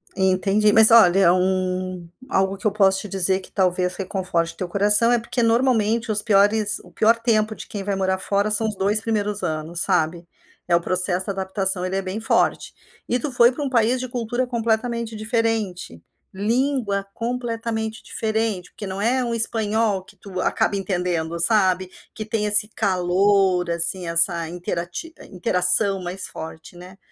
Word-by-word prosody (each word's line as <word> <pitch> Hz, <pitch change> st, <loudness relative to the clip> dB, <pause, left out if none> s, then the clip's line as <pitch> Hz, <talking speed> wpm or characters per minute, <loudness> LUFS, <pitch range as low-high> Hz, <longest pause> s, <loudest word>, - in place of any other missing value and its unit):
Entendi, 195 Hz, +2 st, +1 dB
mas 220 Hz, +1 st, +7 dB
olha, 190 Hz, -5 st, +5 dB
um 185 Hz, -1 st, -2 dB, 0.2 s
algo 190 Hz, 0 st, 0 dB
que 195 Hz, -, -2 dB
eu -, -, 0 dB
posso 195 Hz, -2 st, +2 dB
te 210 Hz, -, -6 dB
dizer 190 Hz, 0 st, +1 dB
que 190 Hz, -, -15 dB
talvez 180 Hz, -1 st, -1 dB
reconforte 180 Hz, -4 st, -3 dB
teu 185 Hz, -, -5 dB
coração, 205 Hz, +5 st, +4 dB
é 240 Hz, -, +3 dB
porque 240 Hz, +2 st, -4 dB
normalmente 230 Hz, -1 st, 0 dB
os 210 Hz, -, +4 dB
piores 210 Hz, 0 st, +3 dB
o 180 Hz, -, -18 dB
pior 225 Hz, +5 st, +2 dB
tempo 215 Hz, -2 st, 0 dB
de -, -, -10 dB
quem 200 Hz, -2 st, -7 dB
vai 200 Hz, 0 st, -3 dB
morar 190 Hz, -1 st, -1 dB
fora 200 Hz, +2 st, -1 dB
são 220 Hz, +1 st, +4 dB
os 215 Hz, -, -4 dB
2 200 Hz, +3 st, -1 dB
primeiros 210 Hz, -2 st, -2 dB
anos, 160 Hz, +2 st, -3 dB
sabe. 170 Hz, -2 st, -1 dB, 0.4 s
É 175 Hz, -, +2 dB
o 170 Hz, -, +1 dB
processo 185 Hz, +1 st, +3 dB
de 200 Hz, -, -3 dB
adaptação, 190 Hz, -1 st, +3 dB
ele 185 Hz, -, -4 dB
é 195 Hz, -, -1 dB
bem 190 Hz, +3 st, -6 dB
forte. 225 Hz, -, 0 dB, 0.4 s
E 245 Hz, -, +1 dB
tu 280 Hz, +3 st, -4 dB
foi 240 Hz, 0 st, +4 dB
para 290 Hz, +3 st, -6 dB
um 280 Hz, -, -3 dB
país 245 Hz, 0 st, +1 dB
de 255 Hz, -, -4 dB
cultura 245 Hz, +1 st, -3 dB
completamente 235 Hz, -1 st, -3 dB
diferente, 215 Hz, -, -3 dB, 0.3 s
língua 215 Hz, -1 st, -2 dB
completamente 230 Hz, -2 st, -5 dB
diferente, 220 Hz, -4 st, -3 dB
porque 205 Hz, -, -9 dB
não 190 Hz, +1 st, -6 dB
é 250 Hz, +4 st, 0 dB
um 235 Hz, -, -3 dB
espanhol, 220 Hz, -3 st, 0 dB
que 205 Hz, -, -19 dB
tu 190 Hz, -1 st, -9 dB
acaba -, -, -1 dB
entendendo, 175 Hz, -4 st, -3 dB
sabe. 185 Hz, -2 st, +2 dB, 0.2 s
Que 215 Hz, -, -6 dB
tem 215 Hz, 0 st, -3 dB
esse 210 Hz, 0 st, +4 dB
calor, 190 Hz, -2 st, 0 dB
assim, 170 Hz, +2 st, +5 dB
essa 170 Hz, 0 st, +4 dB
interati 175 Hz, -, -6 dB
interação 185 Hz, +2 st, +1 dB
mais 180 Hz, +2 st, -4 dB
forte, 160 Hz, +1 st, -10 dB
né. 185 Hz, +2 st, -13 dB
200 Hz, 170 wpm, -21 LUFS, 185-225 Hz, 0.4 s, mas